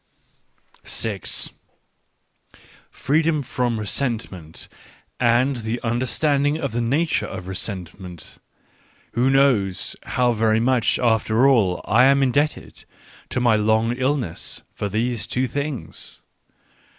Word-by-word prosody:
6 105 -4 -2 1.4
Freedom 155 +1 +1
from 120 -2 -1
resentment 105 - -3 0.5
and 125 +3 +3
the 115 +1 -3
understand 130 +5 +1
ing 145 +2 +1
of 140 -4 -3
the 120 +2 -1
nature 145 +8 +1
of 95 -1 -7
resentment 90 -3 -7 0.4
— - - -34
who 125 +3 +2
knows 125 -9 +2
how 125 -1 +1
very 110 -1 +2
much 125 0 +2
after 115 +1 +3
all 105 -10 +3
I 120 +5 +5
am 140 0 +4
indebted 145 +4 -1 0.5
to - - -1
my 120 -3 +4
long 110 +2 +2
ill* 130 +3 +1
ness 90 - -7
for 105 - -3
these 115 +2 -1
two 130 +1 0
things 140 - -4
120 Hz, 115 wpm, -22 LUFS, 110-135 Hz, 1.4 s, I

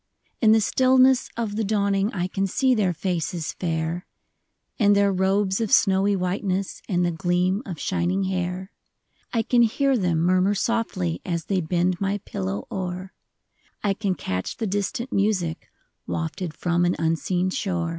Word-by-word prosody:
In 220 -2 +6
the 220 0 +5
stillness 260 +2 +4
of 220 -3 -2
the 225 - +1
dawning 200 0 +1
I 180 -2 -2
can 195 +1 -1
see 260 +7 +2
their 205 -6 +2
faces 170 -2 -2
fair, 165 0 -3 0.7
And 205 -2 +5
their 200 -1 +3
robes 190 +2 +1
of 220 - -1
snowy 195 0 +4
whiteness, 190 +1 -2
And 180 -2 +2
the 175 - +1
gleam 180 +4 0
of 175 -5 -6
shining 185 +1 0
hair; 185 +1 -3 0.6
I 230 -2 +1
can 240 +2 +3
hear 270 +4 +2
them 180 -7 +1
murmur 185 +3 +3
softly 195 - -1
As 170 -2 -3
they 190 -2 0
bend 175 +2 0
my 195 +1 0
pillow 95 +1 -4
o'er; 185 0 -4 0.7
I 200 -2 +2
can 195 -2 -1
catch 95 - -4
the 225 - -2
distant 205 +5 -2
music 195 -5 0 0.4
Wafted 85 - -3
from 175 0 0
an 175 0 +2
unseen 165 +3 0
shore. 175 -4 -1
190 Hz, 155 wpm, -24 LUFS, 175-205 Hz, 0.7 s, In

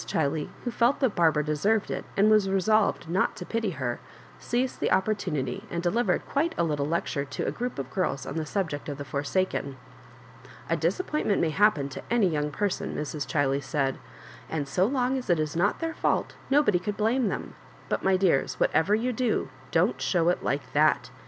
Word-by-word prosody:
Ghiley, 150 +1 -1
who 245 - -2
felt 240 +4 +2
that 260 -6 +2
Barbara 160 -3 +3
deserved 195 +9 +1
it^ - - -3
and 200 +2 +5
was 215 -3 +4
resolved 195 -1 +2
not 180 +3 +1
to 180 - -7
pity 225 0 -1
her, 120 -3 -2 0.4
seized 250 +2 -1
the - - 0
opportunity, 190 -5 0
and 170 -2 -3
delivered 230 +8 +1
quite 325 +4 0
a - - +2
lit 155 -3 0
tle 140 0 -1
lecture 155 -3 -1
to 140 - -4
a - - 0
group 245 0 -4
of 135 -1 -5
girls 135 -8 -1
on - - -5
the 160 -1 -2
subject 160 -6 -2
of 145 - -4
the 145 - -6
forsaken. 140 0 -1 0.7
^' - - -18 0.3
A - - +4
disappointment 305 - 0
may 160 - +1
happen 195 -6 +3
to 130 - -7
any 235 -4 +3
young 150 -2 -1
person," 200 +6 -2
Mrs. 150 -2 -3
Ghiley 140 0 +1
said, 135 0 -1 0.3
" - - -18
and 150 -3 -2
so 180 +8 +2
long 260 0 0
as 250 - -10
it 175 -2 +3
is 155 0 -2
not 190 +5 +2
their 325 0 -2
fault - - 0 0.2
nobody 275 -10 +4
could 205 +3 -4
blame 230 +3 +2
them; 190 - -4 0.3
but^ - - -1
my 190 -1 +3
dears, 180 -8 +1
whatever 185 +6 +3
you 245 +3 -1
do, 245 -1 0 0.2
don't - - +1
show 175 -2 +2
it 180 - 0
like 140 -2 -2
that. 155 +1 +3
180 Hz, 205 wpm, -27 LUFS, 150-215 Hz, 0.7 s, and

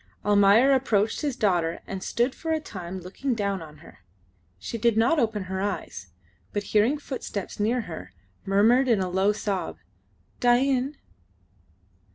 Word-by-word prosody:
Almayer 205 +5 +5
approached 225 -5 +1
his 290 -5 -1
daughter 175 -8 +1
and 195 -1 -6
stood 240 +6 0
for 325 - -4
a 320 - +1
time 185 - -7
looking 235 +9 -3
down 200 -3 -1
on 155 -1 -11
her. - - -16 0.6
She 225 - -6
did 230 0 +2
not 245 +8 +3
open 220 -5 0
her 190 +1 -4
eyes, 185 - -4 0.5
but 205 - -1
hearing 220 +8 +2
footsteps 260 -10 -6
near 230 +4 +1
her, 170 -7 -8 0.3
murmured 225 +7 +4
in 230 -5 +3
a 185 -1 -2
low 190 +3 +3
sob, 205 -3 -3 0.6
"Dain." 260 +3 +2
210 Hz, 150 wpm, -26 LUFS, 190-250 Hz, 0.6 s, Almayer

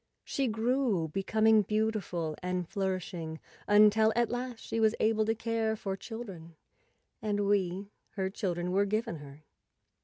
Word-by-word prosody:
She 275 -2 -1
grew, 225 -6 +1
becoming 215 +5 +3
beautiful 205 -6 -1
and 180 -1 -2
flourishing, 180 -4 -3 0.3
until 215 +1 +6
at 235 -1 +2
last 245 0 -3
she 225 - -2
was 220 0 +4
able 220 0 +2
to 225 +1 +1
care 225 0 0
for 195 -3 -3
children, 195 -7 -8 0.7
and 205 -2 0
we, 200 0 0 0.2
her 190 -1 0
children, 180 -3 -2
were 200 +2 +3
given 215 -2 -1
her. 145 0 -12
205 Hz, 135 wpm, -31 LUFS, 180-220 Hz, 0.7 s, until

